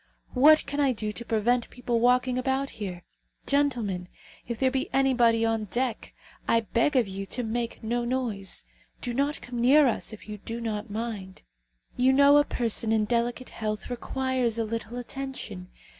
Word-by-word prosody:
What 305 +4 +6
can 285 +1 -4
I 275 -3 +3
do 215 -2 -3
to 235 - -6
prevent 235 +2 +1
people 245 -1 -2
walking 250 +1 +3
about 265 +2 -1
here? 180 -3 -5 0.4
Gentlemen, 240 -11 0 0.4
if 235 -1 -3
there 260 +1 +2
be 265 0 -1
anybody 240 -4 +3
on 225 -1 0
deck, 240 +3 -2 0.3
I 230 - +4
beg 230 +6 +1
of 245 -5 +3
you 195 +1 -5
to 245 - -1
make 235 +1 -3
no 240 +2 -1
noise. 235 -6 -2 0.3
Do 245 - -3
not 280 +4 0
come 245 -1 -4
near 280 +5 +6
us, 240 - 0
if 220 - -11
you 210 -1 -7
do 230 +3 -5
not 215 -2 -4
mind. 210 -3 -5 0.5
You 255 +1 +4
know 280 +1 +7
a 290 - +6
person 230 -4 -1
in 220 -1 +2
delicate 240 +2 -1
health 215 +1 -4
requires 255 -1 -1
a 230 - +1
little 230 +2 -4
attention. 245 -7 -6
240 Hz, 175 wpm, -27 LUFS, 220-260 Hz, 0.5 s, know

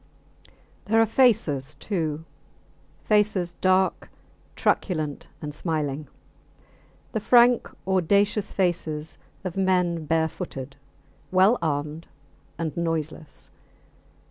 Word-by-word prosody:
There 225 +2 +3
are 225 - +6
faces 200 - +2
too 160 -2 -3 0.8
faces 210 -5 +2
dark, 185 0 +2 0.5
truculent, 155 -6 -1 0.2
and 150 0 -4
smiling; 150 -2 -2 1.0
the 220 - -1
frank 240 +2 +5 0.2
audacious 200 +3 +2
faces 160 -4 -2 0.2
of 185 -3 -4
men 180 -4 +1
barefooted, 150 -4 -2 0.5
well 190 +6 +4
armed 150 +1 -2 0.5
and 165 -2 -3
noiseless. 160 -2 -4
170 Hz, 85 wpm, -25 LUFS, 155-200 Hz, 1.0 s, are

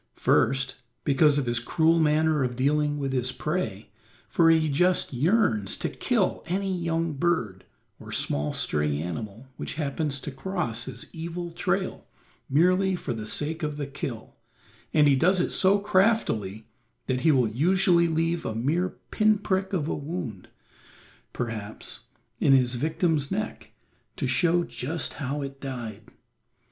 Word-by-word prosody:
First, 135 +2 +2 0.3
because 145 +1 +4
of 140 - 0
his 120 0 +1
cruel 160 +7 +2
manner 155 -1 +3
of 125 -1 -2
dealing 145 +3 +1
with 135 -2 -2
his 125 -1 0
prey, 130 - -3 0.4
for 165 -1 +4
he 160 -1 +4
just 175 +3 +2
yearns 135 - +2
to - - -2
kill - - 0
any 190 +2 -1
young 165 -2 -1
bird, 135 - -1 0.3
or - - -10
small 75 +1 0
stray 75 -1 0
animal 100 - -5
which - - -5
happens 145 -1 -2
to 145 - -5
cross 135 -6 -2
his - - -6
evil 170 +1 -5
trail 185 +2 -2 0.4
merely 185 +6 +3
for 175 - -4
the 110 -2 -6
sake 160 +8 0
of 150 -2 -3
the 145 - -3
kill, 130 -5 -6 0.6
and 150 -1 +5
he 140 - +5
does 180 +7 +3
it - - 0
so 195 +1 +4
craftily 185 - +1 0.4
that 130 -1 -1
he 160 - +5
will 130 -5 +3
usually 170 - +3
leave 165 +1 0
a 110 - -3
mere 160 +11 0 0.2
pin 215 0 +3
prick 190 -2 -1
of 165 -6 -1
a - - -1
wound, 140 - -5 0.8
perhaps, 115 0 -6 0.3
in 140 - +4
his 125 -2 +3
victim's 155 +2 0
neck 215 +3 -4 0.5
to - - -3
show 175 0 +3
just 160 +1 -3
how 140 +1 -2
it 135 0 -8
died. 115 -6 -6
150 Hz, 150 wpm, -26 LUFS, 125-175 Hz, 0.8 s, and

